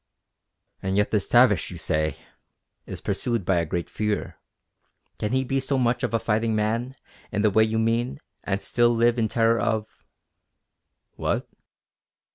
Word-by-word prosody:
"And 95 +1 -1
yet 105 - +2
this 105 -3 +1
Tavish, 120 -9 +4
you 90 - -8
say, 80 -1 -1 0.7
is - - -7
pursued 115 -6 -2
by 95 -1 +2
a 85 -1 0
great 85 +2 -2
fear. 105 -1 -3 0.8
Can 105 - -2
he 130 0 +2
be 135 +1 0
so 135 +1 -1
much 120 -1 +1
of - - -1
a 115 - +2
fighting 110 0 0
man, 115 +5 -1 0.4
in 105 0 -1
the 105 - +4
way 110 +3 +5
you 110 0 -1
mean, 115 - 0 0.2
and 100 0 -2
still 120 0 +2
live 120 +1 +3
in 110 - +2
terror 115 +1 +2
of...." 110 -1 -2 1.2
"_What? - - -1
110 Hz, 160 wpm, -25 LUFS, 105-120 Hz, 1.2 s, way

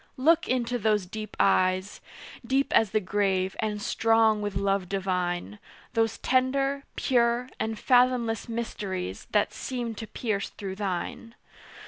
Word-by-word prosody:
Look 320 +5 +3
into 245 -1 0
those 210 -3 +2
deep 215 +3 -7
eyes, 185 +2 +2 0.4
Deep 265 +3 0
as 220 - +5
the 215 - +1
grave, 190 -1 0
and 215 -2 -1
strong 225 0 +3
with 205 -2 -3
love 195 -1 0
divine; 180 - -2 0.3
Those 225 -1 +1
tender, 270 +2 +1
pure, 240 0 +1
and 220 0 -2
fathomless 245 -2 +2
mysteries, 195 - -4
That 210 -1 +2
seem 240 -3 -4
to 220 0 -7
pierce 210 -4 -2
through 190 -2 -7
thine. 200 +4 -4
220 Hz, 130 wpm, -27 LUFS, 195-240 Hz, 0.4 s, as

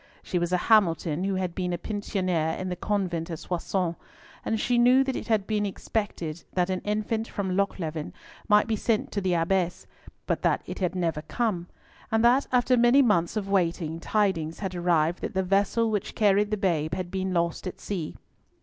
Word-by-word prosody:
She 180 - -1
was 175 0 -1
a 180 - +3
Hamilton 175 -5 +2
who 195 -1 0
had 185 -2 -2
been 180 -1 -2
a - - -1
pensionnaire 185 -5 -1
in 185 - -4
the 180 - -2
convent 180 -5 -2
at 165 - -4
Soissons, 175 +1 -2 0.5
and 220 - -1
she 240 +1 +2
knew 250 +2 +6
that 265 -1 -2
it - - -5
had 215 -4 +2
been 210 -1 0
expected 195 -5 -3
that 180 0 +1
an 185 - -1
infant 215 +2 -1
from 190 -2 -3
Lochleven 165 -6 -2 0.4
might 210 -1 +5
be 225 - 0
sent 215 +1 0
to 200 - -2
the 185 -2 +1
Abbess, 175 +1 0 0.4
but - - -1
that - - +1
it - - -6
had 185 -1 -1
never 165 -4 -1
come, 185 -2 -2 0.4
and 225 +1 +3
that 255 +4 +4
after 250 0 +3
many 240 +3 +5
months 175 -4 +2
of 200 -2 -2
waiting, 170 -4 0
tidings 170 -5 0
had 190 -3 -4
arrived 175 -1 +1
that - - -4
the 190 - +2
vessel 200 +4 +2
which 210 -3 -2
carried 205 -1 +3
the 215 - -1
babe 165 -5 0
had 180 -1 -5
been 190 0 -2
lost 170 +1 -1
at 185 - -7
sea. 175 -7 -4
190 Hz, 195 wpm, -27 LUFS, 170-210 Hz, 0.5 s, knew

